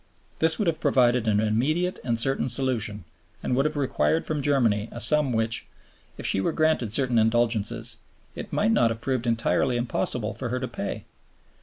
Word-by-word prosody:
This 160 0 +3
would 210 - -1
have 165 -2 -1
provided 125 -5 +3
an 105 -1 +3
immediate 140 +12 0
and 120 -2 -1
certain 135 +1 +1
solution, 120 -5 -2 0.4
and 125 - 0
would 135 +3 +2
have 155 0 -1
required 145 +3 0
from 150 -2 -2
Germany 115 -7 +1
a 120 - -7
sum 135 +5 +3
which, 115 -1 -1 0.5
if - - -6
she 95 - +2
were 165 - 0
granted 155 -9 +1
certain 125 0 +2
indulgences, 115 0 +1 0.4
it - - -8
might 215 +2 +1
not 200 - +3
have 115 0 -4
proved 125 0 -2
entirely 120 +2 +1
impossible 120 -1 -2
for 125 - -5
her 125 +2 -2
to 130 - -3
pay. 115 -4 -5
120 Hz, 180 wpm, -25 LUFS, 115-140 Hz, 0.5 s, This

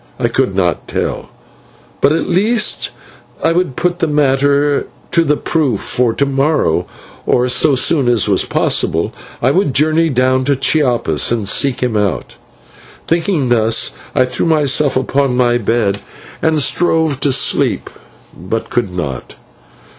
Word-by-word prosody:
I - - 0
could 95 - -1
not 90 -4 -1
tell, - - -4 0.7
but 140 - +4
at 160 - -1
least 215 +5 +1 0.5
I 165 - +3
would 175 -6 -1
put 175 0 -1
the 165 - 0
matter 145 0 +1 0.2
to 170 - +3
the 150 -2 +1
proof, 140 - -1
for 125 -2 0
to 140 - 0
morrow, 135 - 0 0.4
or 125 +1 +2
so 135 +3 +3
soon 135 0 +2
as 120 -4 +2
was - - +2
possible, - - 0 0.3
I 130 - +3
would 160 -5 0
journey 155 +3 +2
down 130 -1 +1
to 140 0 +2
Chiapas 125 - +1
and 110 -4 -1
seek 130 +5 +1
him 125 -3 -1
out. 105 -5 -2 0.7
Thinking 165 -5 0
thus, 115 -1 +2 0.2
I 130 - +3
threw 125 +6 -2
myself 150 -3 +2
upon 130 0 0
my 120 -1 +2
bed 105 -3 0 0.4
and 160 -1 +1
strove 160 -1 +1
to 140 - +1
sleep, 135 - +1 0.5
but 100 +6 -5
could 120 -5 0
not. 70 -7 -5
135 Hz, 145 wpm, -15 LUFS, 120-155 Hz, 0.7 s, but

